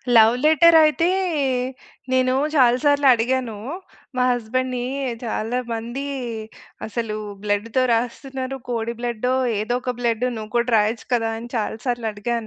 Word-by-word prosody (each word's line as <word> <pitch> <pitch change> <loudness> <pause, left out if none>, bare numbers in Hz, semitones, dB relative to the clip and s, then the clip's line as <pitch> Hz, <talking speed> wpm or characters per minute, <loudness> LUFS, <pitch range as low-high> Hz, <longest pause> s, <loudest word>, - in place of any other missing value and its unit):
Love 225 +1 +7
letter 325 +2 +6
అయితే, 310 +3 +3 1.0
నేను 255 0 +3 0.2
చాలా 250 -3 +5
సార్లు 285 -1 +4
అడిగాను. 240 -1 -1 0.6
మా 250 - +3
హస్బెండ్‌ని 245 +1 -1 0.4
చాలా 225 +2 -2 0.2
మంది 240 +5 -4 0.8
అసలు 220 0 -3 0.3
బ్లడ్‌తో 210 +4 0
రాస్తున్నారు. 260 +3 -3
కోడి 235 -1 -2
బ్లడ్డో, 245 +1 -1 0.3
ఏదో 220 +3 -1
ఒక 250 -1 -2
బ్లడ్ 235 0 0
నువ్వు 215 -1 -7
కూడా 240 +1 +1
రాయొచ్చు 215 +2 0
కదా! 225 -2 +1
అని 235 +1 -9
చాలా 220 0 -2
సార్లు 240 -2 -1
అడిగా 210 +3 -3
240 Hz, 130 wpm, -22 LUFS, 225-255 Hz, 1.0 s, Love